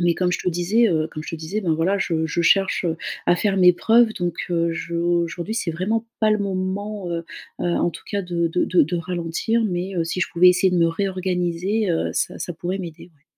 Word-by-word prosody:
Mais 175 -1 +3
comme 180 -1 0
je - - -1
te - - -1
disais, 190 +7 +2
heu, 155 -1 +1
comme 155 - -7
je - - -7
te 165 - -4
disais 160 +7 -4
ben 175 -5 0
voilà 185 +5 +1
je 165 -4 0
je 170 +2 -1
cherche 195 +1 +3 0.4
à 175 - +4
faire 195 +1 0
mes 180 -1 +7
preuves 225 +5 +4
donc, 175 -3 -2 0.2
heu, 170 -1 +1
je 170 0 -5
aujourd'hui 170 +3 -1
c'est 200 -7 -1
vraiment 210 +7 -1 0.2
pas 215 -1 +4
le 215 - +1
moment, 195 0 -3
heu, 170 -1 -3 0.4
heu, - - -2
en 175 0 +1
tout - - -11
cas 200 -1 0
de 170 -2 -1
de 180 +2 +1
de 180 - +3
de 165 +4 -1
ralentir, 175 +6 -1
mais, 185 0 -2
heu, 170 - +2
si 165 +2 -3
je - - +2
pouvais 180 +2 +6
essayer 180 +1 +2
de 180 - +2
me 170 - +4
réorganiser, 185 +2 -1
heu, 165 - -1
ça - - -2
ça 175 - -4
pourrait 180 +4 -3
m'aider, 170 -4 -8
ouais. 155 -5 -23
180 Hz, 240 wpm, -22 LUFS, 170-195 Hz, 0.4 s, mes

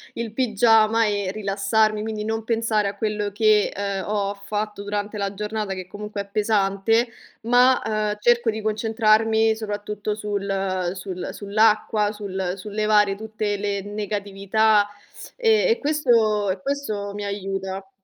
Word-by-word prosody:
il 230 -2 -4
pigiama 225 -1 +3
e 205 -3 -1
rilassarmi; 210 +1 +1
quindi 215 -1 -4
non 225 0 -2
pensare 225 -3 0
a 200 - -8
quello 210 -1 -2
che, 215 0 +3
ehm, 200 -1 -3
ho 205 -1 -1
fatto 205 +1 -4
durante 205 +1 -3
la 200 -1 -2
giornata 210 0 -3
che 185 -1 -7
comunque 210 +1 -7
è - - -7
pesante, 210 +2 +1 0.3
ma, 245 +2 +4
ehm, 215 -1 -1
cerco 240 +1 +3
di 220 0 -2
concentrarmi 220 0 +2
soprattutto 210 -1 -4
sul 195 -3 -2
sul 185 -1 -5
sull'acqua, 210 0 +2
sul 190 -3 -4
sul 205 +2 -8
levare 215 0 0 0.3
tutte 215 -1 -3
le 200 -1 -2
negatività, 205 +1 +1 0.5
e 450 -1 +3
e 455 - +3
questo 230 -9 +2
e 185 - -5
questo 215 -7 -3
mi 205 0 -5
aiuta. 195 -1 -4
210 Hz, 140 wpm, -23 LUFS, 200-220 Hz, 0.5 s, ma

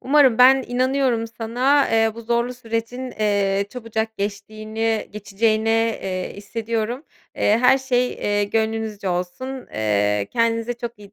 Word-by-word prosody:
Umarım 265 -4 +4
ben 260 +1 +7
inanıyorum 255 -2 +1
sana, 245 +5 +1
eee, 225 -1 +2
bu 230 - -8
zorlu 235 +2 0
sürecin, 245 +2 -4
eee, 200 -2 0
çabucak 225 -2 -4
geçtiğini 215 +2 -3
geçeceğini, 215 +2 0 0.3
eee, 185 -1 -3
hissediyorum. 230 +5 -3 0.3
Eee, 215 +2 +3
her 255 +2 +5
şey, 250 -2 0
eee, 205 0 0
gönlünüzce 220 -2 -2
olsun. 185 +10 -4
Eee, 105 -1 0
kendinize 230 0 +1
çok 235 -2 -7
iyi 200 0 -14
225 Hz, 130 wpm, -22 LUFS, 205-245 Hz, 0.3 s, ben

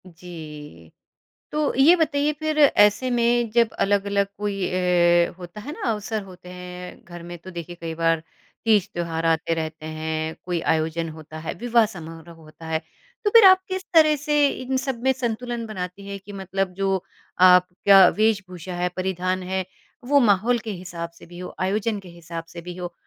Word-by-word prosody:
जी, 155 - -11 0.6
तो 300 -1 0
ये 280 +7 +7
बताइए 300 -3 +1
फिर 310 0 -2
ऐसे 255 -3 +5
में 240 -1 +2
जब 235 0 +3
अलग-अलग 200 0 +1
कोई 200 -2 -2
अ, 175 -1 +3
होता 180 +3 -9
है 285 - -7
ना - - -10
अवसर 215 0 -3
होते 180 -1 -13
हैं 180 0 -9
घर 175 -1 -10
में 175 0 -8
तो 185 +3 -11
देखिए 175 0 -7
कई 165 -1 -4
बार 165 -1 +1 0.4
तीज 215 -4 +3
त्योहार 165 -1 -3
आते 165 0 +1
रहते 160 -1 -5
हैं, 155 0 -3
कोई 175 -1 -1
आयोजन 160 +1 0
होता 155 0 -10
है 160 - -4
विवाह 235 -1 +4
समारोह 165 -4 -10
होता 160 0 -14
है, 160 0 0 0.4
तो 415 - +3
फिर 455 0 +8
आप 375 0 +7
किस 375 0 -4
तरह 310 -2 +6
से 295 0 +2
इन 260 0 -3
सब 265 -2 -3
में 265 - +4
संतुलन 240 -1 -3
बनाती 195 -2 -6
हैं 200 0 -6
कि 205 - -9
मतलब 195 -1 -3
जो 195 -1 -1 0.5
आपका 180 +1 +6
वेशभूषा 190 -5 -1
है, 180 0 0
परिधान 185 0 -2
है 190 0 -2 0.4
वो 285 +1 +5
माहौल 230 +1 +3
के 220 0 -6
हिसाब 175 -3 -6
से - - -13
भी 175 +1 -12
हो, 180 - -8
आयोजन 205 +3 0
के 190 -2 -13
हिसाब 170 -1 -8
से 170 - -7
भी 175 +1 -8
हो 175 -1 -6
185 Hz, 180 wpm, -23 LUFS, 170-225 Hz, 0.6 s, फिर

